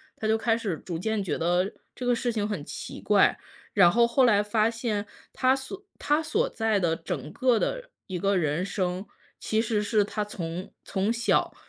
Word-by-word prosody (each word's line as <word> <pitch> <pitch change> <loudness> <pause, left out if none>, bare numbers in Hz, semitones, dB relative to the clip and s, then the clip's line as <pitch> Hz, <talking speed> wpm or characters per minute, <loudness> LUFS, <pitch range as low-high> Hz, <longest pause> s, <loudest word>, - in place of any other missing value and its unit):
他 215 - -3
就 220 +1 +3
开 225 0 +1
始 200 -8 -2
逐 170 +2 -5
渐 220 +4 -1
觉 190 - -2
得 175 +3 +1 0.2
这 250 - -6
个 245 0 +3
事 240 0 -1
情 210 -2 -1
很 205 -8 -3
奇 - - -7
怪。 - - +4 0.4
然 180 -4 +6
后 235 +5 +5
后 235 +3 +3
来 210 -4 +5
发 215 +1 +2
现 225 -3 -2 0.3
他 255 0 +3
所 370 +10 -8
他 295 +2 +2
所 310 -1 0
在 220 -2 +1
的 170 -3 +1
整 165 -4 -5
个 250 -3 +3
的 - - -2 0.2
一 185 - -3
个 195 +2 +1
人 155 +2 0
生， 185 -1 -2 0.4
其 220 0 +1
实 215 -2 0
是 210 -1 +2
他 210 +1 -2
从 180 -2 -6
从 195 +2 0
小 235 0 +1
210 Hz, 210 characters per minute, -27 LUFS, 185-235 Hz, 0.4 s, 然